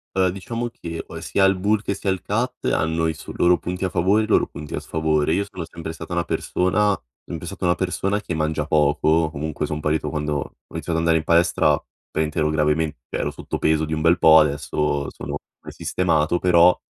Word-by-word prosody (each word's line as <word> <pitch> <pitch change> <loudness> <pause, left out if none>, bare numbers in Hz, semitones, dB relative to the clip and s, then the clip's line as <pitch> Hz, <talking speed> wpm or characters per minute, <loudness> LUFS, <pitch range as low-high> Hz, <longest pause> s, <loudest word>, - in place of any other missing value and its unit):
Uhm, 95 -1 +3
diciamo 115 +6 -4
che, 85 -7 -7
uhm, - - -7
sia 95 - +1
il 95 0 +3
bulk 105 +3 +1
che 100 - -1
sia 95 - -2
il 95 - -2
cut 120 +5 -2
hanno 80 +1 +1
i 80 - 0
s 80 - -10
loro 90 0 +4
punti 90 +2 -3
a - - -1
favore, 100 +5 +2
i - - -3
loro 110 - +3
punti 75 0 -9
a - - -2
sfavore. 80 -1 0
Io 100 +4 +1
sono 90 -3 -6
sempre 80 -1 -7
stata 80 +1 -8
una 85 -1 0
persona 100 +3 +1 0.3
sempre 85 0 -7
stata 95 +1 -6
una 85 - +3
persona 95 +3 -1
che 90 - -4
mangia 80 -1 -1
poco, 80 +1 +2
comunque 80 0 -4
son 75 0 -2
partito 75 +1 0
quando 75 -1 -2
ho - - -7 0.2
iniziato - - -6
ad - - +1
andare 85 0 +3
in - - -4
palestra 85 0 +3 0.3
praticamente 80 +1 -2
ero 75 0 +2
gravement 75 0 +1
ero - - -2
sotto - - -5
peso 80 0 +2
di 80 - -6
un 80 - -2
bel 85 +2 +4
po' 80 0 +8
adesso 75 -1 0
sono - - -6 0.3
sistemato 80 +2 0
però, 90 0 +5
80 Hz, 215 wpm, -22 LUFS, 80-95 Hz, 0.3 s, po